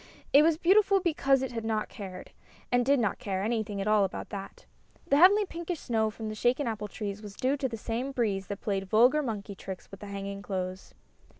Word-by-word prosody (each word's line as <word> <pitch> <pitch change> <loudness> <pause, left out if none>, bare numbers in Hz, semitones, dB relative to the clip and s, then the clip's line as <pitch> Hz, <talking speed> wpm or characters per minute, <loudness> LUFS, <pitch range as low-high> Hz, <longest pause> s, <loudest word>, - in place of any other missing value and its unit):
It 285 - +9
was 315 0 +3
beautiful 390 +3 +4
because 275 -7 +2
it 260 - -3
had 230 -2 -4
not 220 -1 -1
cared, 185 -3 -9 0.4
and 245 0 +3
did 275 +2 +3
not 215 -5 0
care, 190 -1 -2
anything 215 -2 -1
at 195 - -2
all 210 -1 +4
about 190 - -4
that. 195 -1 -8 0.4
The 280 - +3
heavenly 400 +6 +7
pinkish 340 -2 -5
snow 220 -3 0
from 220 +1 -7
the 215 - -4
shaken 245 +6 +1
apple 215 -3 -3
trees 205 0 -5
was 205 -2 -9
due 260 +5 +1
to 270 -1 -1
the 230 - -5
same 235 +5 -3
breeze 205 -7 -1
that 200 0 -6
played 195 -2 -2
vulgar 245 +8 +5
monkey 210 -6 -4
tricks 190 -1 -9
with 195 - -10
the 205 - -9
hanging 200 0 -5
clothes. 185 -2 -5
220 Hz, 215 wpm, -29 LUFS, 200-270 Hz, 0.4 s, It